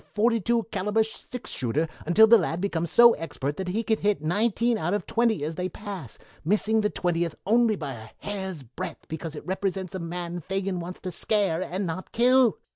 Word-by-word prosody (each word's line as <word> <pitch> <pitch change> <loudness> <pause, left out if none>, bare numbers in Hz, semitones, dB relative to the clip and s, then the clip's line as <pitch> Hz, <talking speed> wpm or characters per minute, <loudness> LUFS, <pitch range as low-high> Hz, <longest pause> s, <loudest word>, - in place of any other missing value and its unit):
42 230 +1 +2
caliber 210 +2 +1
six 225 +2 -7
shooter, 135 +6 -1 0.2
until 205 +6 +7
the 225 +1 +7
lad 165 -1 -2
becomes 170 -4 -1
so 235 +4 +7
expert 145 -3 -4
that 190 - -4
he 210 +6 -1
can 220 -1 +1
hit 205 0 +1
nineteen 220 +8 +1
out 190 -2 0
of 205 - -3
twenty 225 -8 +1
as 155 +2 -2
they 180 +2 -3
pass, 190 - -7 0.3
missing 215 +5 +2
the 210 - +1
twentieth 170 -4 -1
only 225 +1 +4
by 145 -7 -5
a 110 -2 -10
hair's 190 -7 -5
breadth 125 0 -7
because 160 0 -6
it - - -8
represents 190 0 -2
a 190 - -3
man 175 +1 -4
Fagin 195 +1 -2
wants 175 +2 -6
to 185 - -4
scare 190 -2 +1
and 185 +2 -2
not 175 +2 -5
kill. 250 0 +4
190 Hz, 195 wpm, -26 LUFS, 170-220 Hz, 0.3 s, until